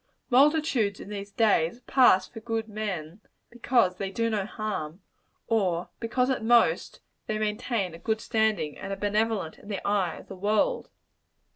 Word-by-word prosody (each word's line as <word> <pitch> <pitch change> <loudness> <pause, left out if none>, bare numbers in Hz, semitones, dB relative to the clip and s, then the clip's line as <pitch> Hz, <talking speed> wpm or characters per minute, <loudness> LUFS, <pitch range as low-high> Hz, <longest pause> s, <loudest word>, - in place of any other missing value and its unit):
Multitudes, 270 -6 +3
in - - -9
these 200 -1 -6
days, 215 0 +2
pass 240 -8 +4
for 225 - -10
good 225 -1 -3
men 205 -4 -5 0.3
because 235 -6 +2
they 195 0 -3
do 230 +3 -1
no 205 -2 -1
harm; 195 -6 -5 0.4
or 185 -6 0
because, 250 +3 0
at 255 - -2
most, 225 -8 +3 0.3
they 215 - -1
maintain 215 -3 -1
a 165 - -10
good 220 +3 -1
standing, 220 -10 0
and - - -6
are - - -1
benevolent 205 -3 -1
in - - -16
the 200 -2 -4
eye 200 -4 +1
of - - -12
the 195 - -8
world. 215 - 0
215 Hz, 160 wpm, -27 LUFS, 195-230 Hz, 0.4 s, pass